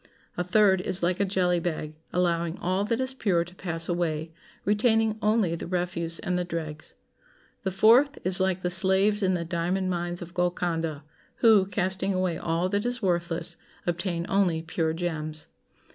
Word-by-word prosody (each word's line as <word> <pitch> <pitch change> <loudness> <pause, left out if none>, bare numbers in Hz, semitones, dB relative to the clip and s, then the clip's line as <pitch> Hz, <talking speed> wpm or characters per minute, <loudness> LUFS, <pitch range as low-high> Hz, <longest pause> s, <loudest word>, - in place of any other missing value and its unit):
A 180 - -1
third 190 0 +4
is 185 -1 -1
like 175 +1 +1
a 200 - +2
jelly 180 -2 +1
bag, 155 -3 -3 0.2
allowing 170 -2 0
all 185 +3 -1
that 230 +2 -1
is 260 0 -2
pure 190 -9 +1
to 175 - -13
pass 165 -3 -3
away, 165 -2 -2 0.3
retaining 220 +1 +2
only 210 -5 +2
the 170 - -5
refuse 175 -2 -2
and 180 0 -1
the - - 0
dregs. 160 -3 -6 0.7
The 190 - -1
fourth 235 +10 +4
is 185 +1 +1
like 190 -1 0
the 180 - +1
slaves 190 +3 +5
in 185 -1 +2
the 170 -1 -3
diamond 180 +3 -1
mines 175 0 -3
of 175 +1 -12
Golconda, 170 -4 -1 0.3
who, 215 -5 +5
casting 190 0 -1
away 185 -2 -1
all 165 +2 0
that 205 +1 0
is 245 -1 -2
worthless, 170 -2 -1 0.3
obtain 175 0 -2
only 180 -5 +1
pure 160 -1 -1
gems. 155 -2 -4
180 Hz, 170 wpm, -26 LUFS, 170-195 Hz, 0.7 s, slaves